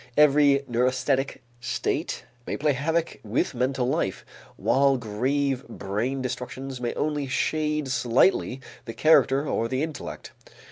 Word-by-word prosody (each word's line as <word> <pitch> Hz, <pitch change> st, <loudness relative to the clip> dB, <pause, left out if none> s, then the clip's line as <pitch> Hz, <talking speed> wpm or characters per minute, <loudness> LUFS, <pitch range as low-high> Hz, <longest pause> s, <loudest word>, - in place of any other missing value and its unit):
Every 145 Hz, -1 st, +5 dB
neurasthenic 130 Hz, +3 st, 0 dB, 0.2 s
state 125 Hz, 0 st, -2 dB, 0.2 s
may -, -, -2 dB
play 150 Hz, 0 st, +2 dB
havoc 160 Hz, +5 st, -1 dB
with 110 Hz, +2 st, -1 dB
mental 130 Hz, +1 st, 0 dB
life, 130 Hz, -, -1 dB, 0.3 s
while 135 Hz, 0 st, +3 dB
grave 130 Hz, +4 st, -1 dB
brain 115 Hz, +5 st, -3 dB
destructions 130 Hz, +1 st, -5 dB
may 120 Hz, -, -2 dB
only 150 Hz, -2 st, -1 dB
shade 150 Hz, +2 st, 0 dB
slightly 130 Hz, +2 st, +2 dB, 0.2 s
the 115 Hz, -, -6 dB
character 145 Hz, -1 st, +4 dB
or 115 Hz, -, 0 dB
the 130 Hz, +4 st, -1 dB
intellect. 160 Hz, -2 st, -6 dB
135 Hz, 125 wpm, -26 LUFS, 125-145 Hz, 0.3 s, Every